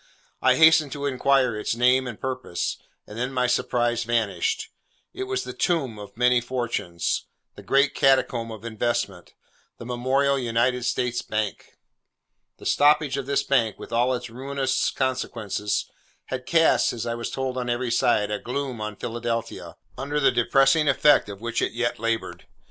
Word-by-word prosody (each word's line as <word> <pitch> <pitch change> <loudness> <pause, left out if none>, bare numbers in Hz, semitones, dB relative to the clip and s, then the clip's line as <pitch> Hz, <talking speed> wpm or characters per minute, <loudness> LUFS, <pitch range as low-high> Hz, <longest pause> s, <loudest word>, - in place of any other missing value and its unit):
I 130 -1 +4
hastened 160 -2 +5
to 145 -1 -4
inquire 135 -2 +2
its 105 +1 -2
name 125 +2 +3
and 120 -4 -7
purpose, 130 -9 -3 0.3
and 105 +2 -9
then 125 +2 -2
my 125 -1 +1
surprise 120 -1 0
vanished. 435 - -1 0.4
It 390 - -4
was 390 0 -2
the - - -7
Tomb 135 - -1
of 100 0 -11
many 125 0 +4
fortunes; 115 -9 -2 0.3
the - - -12
Great 140 0 +2
Catacomb 125 -3 +2
of 110 0 -9
investment; 115 -5 -3 0.4
the 115 - -9
memorable 135 +3 +1
United 120 +1 0
States 125 -1 -1
Bank. 105 -1 -4 0.8
The - - -14
stoppage 150 -1 +3
of 135 -1 -4
this 140 0 +1
bank, 115 -6 +1
with - - -10
all 125 +2 +2
its 125 - -6
ruinous 135 +1 -1
consequences, 115 -6 -2 0.4
had 125 -1 -5
cast 165 -1 +3
(as 115 -1 -4
I 115 - -2
was 115 0 -4
told 130 -1 -3
on 125 -1 -3
every 120 0 -1
side) 105 -3 +2
a 105 - -2
gloom 130 -2 -4
on 105 0 -4
Philadelphia, 115 +1 -4 0.2
under 145 +2 -2
the 135 -2 +4
depressing 135 +5 +3
effect 140 -4 +4
of 100 0 -8
which 115 0 -2
it - - -1
yet 120 -1 -1
laboured. 115 0 -3
125 Hz, 165 wpm, -24 LUFS, 115-135 Hz, 0.8 s, hastened